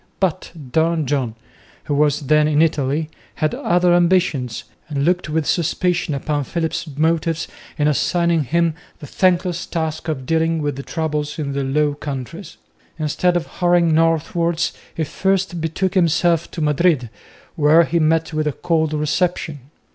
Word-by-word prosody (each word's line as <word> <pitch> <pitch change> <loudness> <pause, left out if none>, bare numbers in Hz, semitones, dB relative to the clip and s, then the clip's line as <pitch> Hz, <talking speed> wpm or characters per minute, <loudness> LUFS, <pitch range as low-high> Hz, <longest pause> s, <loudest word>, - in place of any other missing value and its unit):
But 185 -1 -1 0.2
Don 160 0 +1
John, 130 -5 -1 0.5
who 145 - -3
was 145 0 +2
then 150 +2 +3
in 155 +1 +3
Italy, 150 0 0 0.2
had 155 -1 0
other 175 0 +2
ambitions, 170 -9 +1 0.3
and 140 -2 -1
looked 180 -2 +1
with 155 0 0
suspicion 175 -1 0
upon 145 +1 -1
Philip's 165 +2 -3
motives 165 +1 0 0.3
in 150 -1 +2
assigning 170 +1 +1
him 170 +3 +1 0.2
the - - -10
thankless 180 +2 0
task 160 -1 -3
of 140 -5 -3
dealing 165 +2 +1
with 145 -2 -2
the 140 - -5
troubles 150 0 -3
in 140 -3 -3
the 140 0 -1
Low 145 +2 +1
Countries. 145 +5 -7 0.4
Instead 170 +3 +1
of 170 - -3
hurrying 175 -2 +2
northwards, 165 +1 +1 0.2
he 160 - -1
first 190 +1 -1
betook 175 +4 -1
himself 170 -2 +2
to 165 - -6
Madrid 150 -5 +2 0.4
where 160 +1 +5
he 170 +1 0
met 160 0 +1
with 155 0 0
a 150 - 0
cold 160 -1 0
reception. 150 0 -1
160 Hz, 150 wpm, -20 LUFS, 150-170 Hz, 0.5 s, where